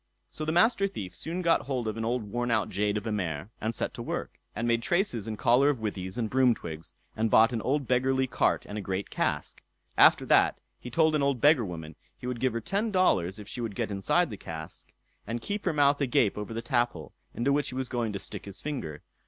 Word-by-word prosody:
So 155 - -5
the 155 - 0
Master 195 +4 +4
Thief 95 - -7
soon 170 - -4
got 170 -4 +2
hold 125 -5 -2
of 110 - -2
an 115 - -3
old 120 +1 0
worn 120 +4 -3
out 110 -2 +1
jade 105 +2 0
of 105 - -5
a 110 - -2
mare, 90 -2 -3
and 110 +1 -2
set - - -2
to - - -7
work, - - -5 0.2
and 115 +2 -1
made 115 0 +2
traces 175 - 0
and 110 -1 -4
collar 125 +6 +4
of 145 - +1
withies 95 -3 -4
and 115 -2 0
broom 125 0 +3
twigs, 80 0 -8 0.2
and 110 +1 +1
bought 115 +3 +5
an 115 - -1
old 140 +2 0
beggarly 130 +1 +2
cart 125 - +1
and 105 +1 -5
a - - -4
great 95 0 -3
cask. - - -2 0.3
After - - +6
that - - +4 0.2
he 125 - -8
told 160 +5 +3
an 150 - +2
old 140 -2 +1
beggar 145 -1 +5
woman, 80 -4 -7 0.2
he - - -10
would 125 -1 -3
give 130 -1 +1
her 115 - -2
ten 205 - -1
dollars 100 - +2
if 105 -1 -9
she 120 - -5
would 110 -4 -4
get - - -2
inside 100 - +1
the 105 - -6
cask, 80 -3 -9 0.4
and 115 +2 -2
keep 205 - -4
her 180 - +2
mouth 145 -1 +3
agape 120 -6 +2
over 105 +1 -5
the 115 +1 -4
taphole, 120 - -1 0.2
into 135 +4 +1
which 145 0 +1
he 125 - -7
was 130 -1 -2
going 120 -3 -1
to 100 - -3
stick - - -7
his 100 -1 -9
finger. 80 - -5
120 Hz, 245 wpm, -28 LUFS, 105-140 Hz, 0.4 s, After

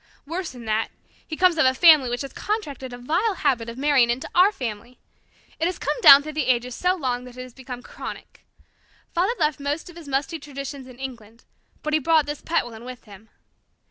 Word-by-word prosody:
Worse 340 +4 -4
than 245 -2 -11
that, 220 0 0 0.4
he 315 - -5
comes 360 -3 +3
of 315 - +5
a 260 - +2
family 305 -4 +7
which 245 +3 -2
has 275 - -8
contracted 290 - -4
a 245 - -7
vile 340 - 0
habit 250 -8 0
of 230 - -8
marrying 275 -3 +3
into 240 +3 -2
our 370 +3 +6
family. 240 - -6 0.6
It 325 - +1
has 365 - -3
come - - -2
down 280 -6 +10
through 305 +1 -7
the 305 -2 -1
ages 250 0 +1
so 360 +7 +1
long 250 -7 -2
that 250 0 -12
it 255 - -6
has 255 -1 -12
become 250 -1 -9
chronic. - - -9 0.7
Father 370 +7 +1
left 300 -2 0
most 290 +5 -3
of - - -19
his 335 -3 -11
musty 280 +4 -2
traditions 275 -2 -8
in 250 -2 -13
England, 235 -4 -9 0.4
but 305 - -2
he 310 - +4
brought 315 +1 +3
this 295 0 -5
pet 335 -5 0
one 230 -1 -10
with 250 0 -9
him. 210 +1 -15
275 Hz, 215 wpm, -23 LUFS, 245-315 Hz, 0.7 s, down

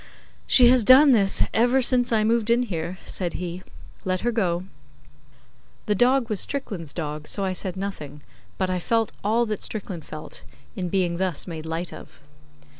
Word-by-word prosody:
'She 250 -2 +7
has 250 -2 +5
done 270 +5 +7
this 200 -5 +4
ever 245 +4 +3
since 250 -1 +2
I 220 -2 +2
moved 225 0 +1
in 240 +1 +3
here,' 175 -4 -4
said 175 -3 -3
he. 180 0 -5 0.4
'Let 185 -1 -1
her 240 - 0
go.' 180 -6 -1 1.2
The 210 - +1
dog 245 +3 +2
was 215 -4 -2
Strickland's 200 - -3
dog, 150 -2 -5
so 200 - 0
I 190 - -1
said 185 0 -3
nothing, 150 -7 -6 0.3
but 185 -1 -1
I 180 - -1
felt 225 +4 0
all 225 +4 +2
that 215 -2 -4
Strickland 190 -6 -4
felt 155 +1 -9 0.3
In 180 -2 -3
being 175 -2 0
thus 185 -4 -1
made 160 -3 -7
light 165 +2 -4
of. - - -13
195 Hz, 175 wpm, -24 LUFS, 175-235 Hz, 1.2 s, She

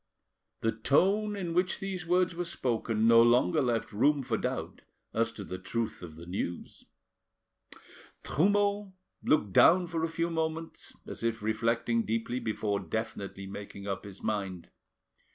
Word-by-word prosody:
The 115 - +2
tone 195 - +2
in 175 -4 -3
which 180 +2 +2
these 190 -3 -4
words 180 +1 +3
were 175 +1 -2
spoken 115 -8 0
no 115 0 +8
longer 125 +6 +4
left 120 -4 -1
room 140 +6 +3
for 120 -3 -1
doubt - - -3 0.3
as 115 0 +1
to 100 - -7
the 90 -1 -6
truth 115 +4 -3
of 85 -3 -9
the 85 +1 -10
news. 85 -1 -5 1.4
Trumeau 205 +3 +1 0.3
looked 105 -11 +2
down 180 - +6
for 165 -1 -3
a 165 - 0
few 165 +1 -1
moments, 160 0 -3
as - - -7
if 115 -2 -1
reflecting 115 +1 +1
deeply 115 +3 -2
before 110 -3 -1
definitely 100 -3 -4
making 100 0 -8
up 100 -2 -3
his 100 -2 -11
mind. 95 -5 -3
115 Hz, 150 wpm, -30 LUFS, 105-165 Hz, 1.4 s, no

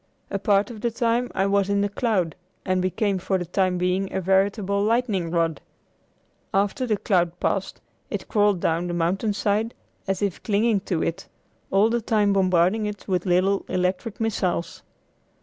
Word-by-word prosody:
A 200 - -1
part 200 +3 +2
of 220 -3 -9
the 235 - +1
time 235 +1 0
I 195 - +2
was 200 0 +2
in 200 0 +2
the 205 - +2
cloud 200 -6 0 0.3
and 185 -1 +1
became 190 +1 0
for 190 +1 0
the 175 - -4
time 185 +1 0
being 180 +2 0
a - - -1
veritable 195 +2 +1
lightning 215 -6 +1
rod. 165 -2 0 0.9
After 205 +6 0
the 215 -3 +1
cloud 175 -3 0
passed - - -1 0.3
it - - -4
crawled 205 -3 +2
down 170 +1 0
the 175 - -3
mountainside 205 +5 0 0.3
as 195 +1 -1
if 200 -4 -2
clinging 215 0 +2
to 175 -5 0
it, 170 +3 -3 0.4
all 205 +4 +3
the 235 0 +1
time 210 -2 +2
bombarding 185 +2 +2
it 205 -1 -7
with 185 -2 -1
little 185 +2 +2
electric 185 +4 -1
missiles. 185 -5 -1
195 Hz, 165 wpm, -24 LUFS, 180-210 Hz, 0.9 s, all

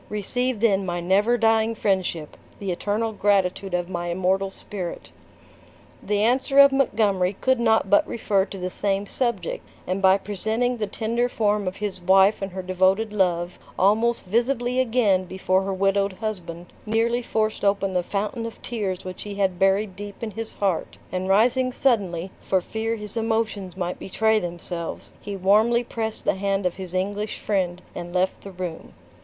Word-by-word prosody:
Receive 235 +3 -1
then 200 -4 +3
my 175 -2 -2
never 200 +7 +2
dying 225 0 +2
friendship, 185 -7 -1 0.2
the 195 -2 -3
eternal 210 +5 -1
gratitude 195 -2 +1
of 175 -1 -1
my 175 -1 -4
immortal 190 +2 +1
spirit." 190 -2 -7 0.9
The 205 0 0
answer 260 +4 +2
of 280 0 +9
Montgomery 205 -8 +2
could 260 -1 +2
not 225 -1 +3
but 305 0 +4
refer 200 -4 +1
to 195 - -8
the 185 0 -4
same 200 +1 -1
subject, 225 -6 -2 0.2
and 185 +2 -2
by 190 0 +6
presenting 220 +5 -1
the 215 -2 -2
tender 235 +4 -1
form 210 -4 0
of 185 - -2
his 200 -3 -4
wife 190 +3 +4
and 195 0 -3
her 190 0 -5
devoted 190 +4 +1
love, 175 -3 0 0.2
almost 220 +5 +2
visibly 245 +4 +1
again 225 -7 +2
before 185 +1 0
her 195 0 -2
widowed 195 +1 +1
husband, 180 -5 -6
nearly 230 +2 +1
forced 220 -2 -1
open 200 -1 +1
the 180 - +2
fountain 210 +5 -3
of 230 - -10
tears 195 -6 -3
which 185 0 -7
he 205 -1 -6
had 190 -3 0
buried 195 0 +2
deep 205 +2 -8
in 220 - -3
his 225 +1 -4
heart; 195 -5 -1
and 185 +1 -2
rising 245 +6 +3
suddenly, 195 -9 0
for 190 - +1
fear 225 +5 -3
his 210 -1 -7
emotions 220 -5 -1
might 180 -1 -3
betray 220 +3 +1
themselves, 175 -2 -6
he 205 -1 -5
warmly 215 +5 +3
pressed 225 -2 -4
the - - +3
hand 195 0 -1
of 180 - -1
his 185 -1 -7
English 205 +3 -2
friend, 185 -3 -1
and 175 +1 -7
left 185 +1 0
the 200 - -9
room. 180 -3 -6
200 Hz, 170 wpm, -24 LUFS, 185-225 Hz, 0.9 s, of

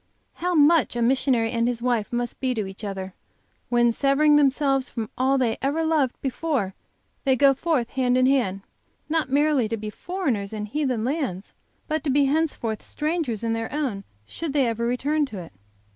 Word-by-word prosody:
How 355 0 -1
much 310 -2 +4
a 240 - -1
missionary 245 -2 +2
and 230 0 +1
his 245 -1 -1
wife 235 -3 0
must 240 0 -3
be 255 -1 0
to 215 -3 -1
each 190 +2 -10
other, 190 -2 -5 0.6
when, 240 -1 +3
severing 280 +5 +3
themselves 275 -2 +2
from 225 -3 -5
all 265 +2 +2
they 235 -4 0
ever 285 +4 0
loved 300 -6 +1
before, 265 -7 -1 0.5
they 265 -2 +3
go 275 +2 +5
forth, 270 -4 0
hand 255 -1 +1
in 255 - +4
hand, 240 -8 +1 0.5
not 315 -3 0
merely 285 -3 +2
to 225 +1 -3
be 210 0 -6
foreigners 250 - -3
in 210 -1 -3
heathen 250 -1 -1
lands, 255 - -3 0.3
but 310 -1 -1
to 300 - -1
be 280 +1 +3
henceforth 275 -7 -1
strangers 300 - -2
in 225 -1 0
their 225 0 -3
own 260 -9 -2 0.2
should 310 - -5
they 280 -3 +3
ever 230 0 -1
return 290 +5 0
to 220 - -8
it! 170 - -9
260 Hz, 185 wpm, -24 LUFS, 225-290 Hz, 0.6 s, go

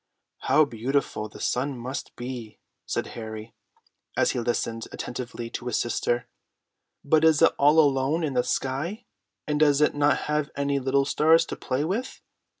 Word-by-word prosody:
"How 155 - +4
beautiful 120 -3 -2
the - - -13
sun 130 +2 -1
must 130 +3 -6
be!" 120 -3 -7 0.3
said - - -1
Harry, 110 -1 -7 0.6
as - - +3
he - - -2
listened 115 -1 -2
attentively 120 -1 -6
to 125 - -5
his 125 - 0
sister. 120 0 -1 0.8
"But 155 +2 +3
is 160 -2 +5
it - - +6
all 145 +3 +5
alone 145 +2 +2
in 145 -3 -1
the 125 -1 +2
sky, 155 - -2 0.4
and 150 -1 -1
does 145 -2 +4
it 150 - +3
not 145 0 +2
have 150 -1 0
any 140 0 0
little 135 +1 +1
stars 160 +3 +4
to - - -5
play 130 +3 -2
with?" 225 +10 -3
135 Hz, 160 wpm, -26 LUFS, 120-150 Hz, 0.8 s, it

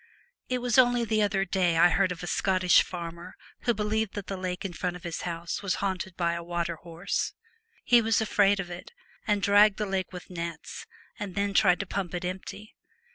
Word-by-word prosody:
It 250 -1 -1
was 245 0 +3
only 245 -1 +4
the 220 -1 +1
other 195 -1 +1
day 180 -2 +1
I 175 +2 +7
heard 190 0 +2
of 180 0 -6
a - - -3
Scottish 185 +1 +3
farmer 170 -1 -7 0.3
who 240 - +3
believed 215 0 -1
that 205 -2 -4
the 195 - -4
lake 185 0 -4
in 185 - -4
front 180 +1 -3
of 180 - -11
his 170 -1 -4
house 170 -1 -4
was 200 -2 0
haunted 190 -2 -3
by 170 -1 +1
a 170 - -4
water 170 -1 -2
horse. 170 +3 -3 0.5
He 240 -1 +5
was 225 -1 +2
afraid 205 -2 +3
of 180 -2 -4
it, 175 - -9 0.3
and 205 -2 +1
dragged 205 0 +5
the 210 - -1
lake 190 -1 -2
with 180 0 -10
nets, 170 -2 -6 0.3
and 200 -3 -5
then 200 0 0
tried 185 -3 +4
to - - -4
pump 185 -2 -3
it 180 0 -3
empty. 190 +3 -6
190 Hz, 210 wpm, -28 LUFS, 175-205 Hz, 0.5 s, I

